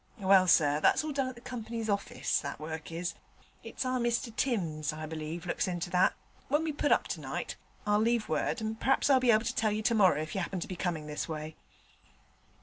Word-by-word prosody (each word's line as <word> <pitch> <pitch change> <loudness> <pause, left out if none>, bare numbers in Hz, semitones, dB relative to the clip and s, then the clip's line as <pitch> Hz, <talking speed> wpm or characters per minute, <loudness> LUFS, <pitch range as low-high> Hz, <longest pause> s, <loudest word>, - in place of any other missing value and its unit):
'Well, 190 -2 +5
sir, 150 -3 +4
that's 155 - +4
all 310 - -3
done 270 -2 0
at 255 - -6
the 235 - -13
Company's 230 -2 -5
orfice, 200 -1 0
that - - -6
work 160 +1 -6
is: 170 +2 -3 0.5
it's - - -5
our 255 0 0
Mr 235 0 -1
Timms, 165 - -1
I 155 +1 -6
believe, 160 +2 -5
looks 175 - -1
into 175 0 -3
that. 180 0 +3 0.3
When 295 +3 +2
we 320 - -1
put 290 0 0
up - - +3
tonight - - -4 0.3
I'll 210 0 +3
leave 230 0 +1
word, 240 - -1
and 220 0 -3
per'aps 270 +1 +3
I'll 265 - +6
be 250 -1 +1
able 220 0 +5
to - - -2
tell 220 -1 +2
you 215 +1 -2
tomorrer 210 -8 +4
if 155 +1 -4
you 195 - -1
'appen 185 +1 -3
to - - -5
be 185 - -5
coming 170 -3 -2
this 150 +2 -4
way.' 155 0 -5
200 Hz, 220 wpm, -30 LUFS, 165-235 Hz, 0.5 s, I'll